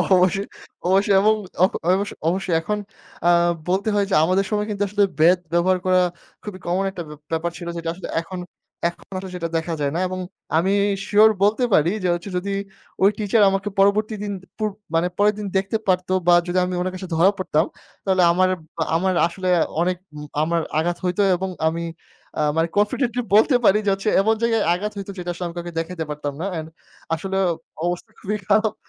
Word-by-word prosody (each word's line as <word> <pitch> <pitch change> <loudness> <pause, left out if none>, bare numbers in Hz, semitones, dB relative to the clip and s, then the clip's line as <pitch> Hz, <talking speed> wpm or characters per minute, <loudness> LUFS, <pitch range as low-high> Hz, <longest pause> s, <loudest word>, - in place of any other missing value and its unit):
অবশ্যই, 185 +2 +2 0.4
অবশ্যই। 195 +1 +3
এবং 215 +1 +4 0.3
অ - - +9 0.3
অবশ্য, 200 +2 -1 0.2
অবশ্যই 185 -2 -1
এখন 210 +5 -2 0.5
আ - - +5 0.4
বলতে 195 +4 +1
হয় 200 -1 +2
যে, - - +2
আমাদের 185 +3 +2
সময় 210 0 0
কিন্তু 205 -1 -1
আসলে 205 +1 +2 0.2
বেদ 175 +3 +6 0.2
ব্যবহার 180 +2 +3
করা 185 0 +4 0.4
খুবই 195 -3 -7
কমন 185 +3 +1
একটা 175 -3 -6
ব্য - - -8 0.2
ব্যাপার 165 +1 -1
ছিল, 170 -1 -7
যেটা 165 0 -3
আসলে 185 - -8
এখন, 180 +2 -6 0.5
এখন 170 - -8
আসলে 185 0 -6
সেটা 170 -2 -3
দেখা 165 +1 -3
যায় 140 -1 +1
না। - - 0
এবং 185 0 -4 0.4
আমি 190 +4 +2 0.4
শিউর 215 +1 +6
বলতে 215 +5 +3
পারি 160 +4 +4
যে - - +2
হচ্ছে, 175 +3 -5
যদি 200 +2 -3 0.5
ওই 200 - +8
টিচার 210 +1 +2
আমাকে 195 +1 -1
পরবর্তী 210 +2 +3
দিন 205 - -3
দুপুর 215 +3 -4 0.3
মানে 170 +2 +3
পরের 210 +1 +4
দিন 205 - -4
দেখতে 195 +3 0
পারতো 185 0 +1
বা 175 - +7
যদি 180 +1 -1
আমি 180 - -3
ওনার 185 +1 -2
কাছে 185 0 -7
ধরা 180 +5 +5
পড়তাম, 165 -3 +1 0.4
তাহলে 190 -2 +3
আমার 185 +1 +3 0.5
আমার 185 +2 +1
আসলে 185 +2 -5 0.3
অনেক 180 0 +1 0.2
উম 150 0 -7 0.2
আমার 165 +1 +1 0.2
আঘাত 175 +2 0
হইতো 180 +3 0
এবং 190 +1 -3 0.2
আমি 170 +1 -4 0.6
আ - - +2 0.2
মানে 165 +1 +3
কনফিডেন্টলি 240 +4 +1
বলতে 245 +5 +5
পারি 195 - +6
যে - - +3
হচ্ছে, 195 +2 -1
এমন 220 +2 +2
জায়গায় 225 -2 +2
আঘাত 210 +4 -2
হইতো, 200 0 -5
যেটা 175 0 -5
আসলে 180 +1 -5
আমি 170 - -9
কাউকে 175 0 -5
দেখাতে 165 0 -4
পারতাম 145 -1 -4
না। - - -2
অ্যান্ড 160 -2 -4 0.5
আসলে 190 +4 -2 0.5
অবস্থা 175 +5 -3
খুবই 210 +1 -2
খারাপ 215 +1 +3
185 Hz, 195 wpm, -22 LUFS, 175-205 Hz, 0.6 s, অ